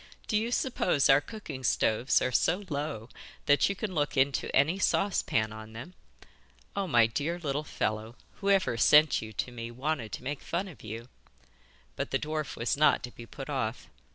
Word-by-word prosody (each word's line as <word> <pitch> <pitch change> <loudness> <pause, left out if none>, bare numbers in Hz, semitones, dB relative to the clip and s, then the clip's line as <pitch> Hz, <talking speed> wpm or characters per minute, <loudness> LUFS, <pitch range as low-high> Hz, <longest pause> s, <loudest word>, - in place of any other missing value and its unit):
Do 215 - -1
you 220 +2 +1
suppose 245 - +1
our 135 +1 +6
cooking 155 - -8
stoves 115 +1 +2
are 130 - 0
so 175 - +1
low 145 -7 -3 0.4
that 145 +5 +4
you 200 - -1
can 200 -1 -4
look 145 -3 -1
into 135 +1 +2
any 155 +8 +3
saucepan 115 - +1
on 110 0 -10
them? 130 +11 -9 0.8
Oh, 200 -1 -1
my 120 -7 +5
dear 145 +9 -2
little 150 -3 -2
fellow, 110 -4 -3 0.2
whoever 195 - +2
sent 150 +6 +6
you 110 - -7
to 125 - -3
me 115 -1 -6
wanted 130 -2 -3
to - - -5
make 140 +2 -4
fun 185 +4 -2
of 175 - -12
you.' 115 +2 -7 0.9
But - - -3
the 135 - +1
dwarf 150 -5 -3
was 115 0 0
not 150 0 +4
to 125 - -6
be 120 -1 -11
put 135 +3 -8
off. 130 -5 -3
140 Hz, 180 wpm, -29 LUFS, 115-165 Hz, 0.9 s, our